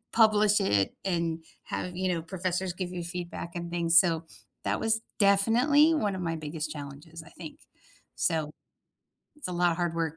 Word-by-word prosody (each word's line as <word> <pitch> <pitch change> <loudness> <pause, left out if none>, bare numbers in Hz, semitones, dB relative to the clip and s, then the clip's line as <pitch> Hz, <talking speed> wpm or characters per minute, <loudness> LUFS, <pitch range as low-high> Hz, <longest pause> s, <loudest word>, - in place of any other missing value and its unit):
publish 215 -2 +5
it 100 - +1
and 170 -3 -1 0.2
have, 180 -1 -4
you 185 - -1
know, 170 -2 -1
professors 180 +1 -2
give 180 0 -5
you 180 -1 -4
feedback 175 -1 -6
and 170 0 -4
things, 170 -1 +4
so 165 -3 0 0.4
that - - 0
was 225 0 +1 0.2
definitely 240 +11 +5
one 210 -10 0
of - - -5
my 165 -1 -1
biggest 155 0 -4
challenges, 150 +3 -9
I 160 - -15
think. 160 -3 -10 0.6
So, 155 -2 0 0.9
it's 295 - -6
a - - -4
lot 175 0 +3
of - - -4
hard 175 -1 -1
work. 160 -2 -1
175 Hz, 175 wpm, -28 LUFS, 165-195 Hz, 0.9 s, publish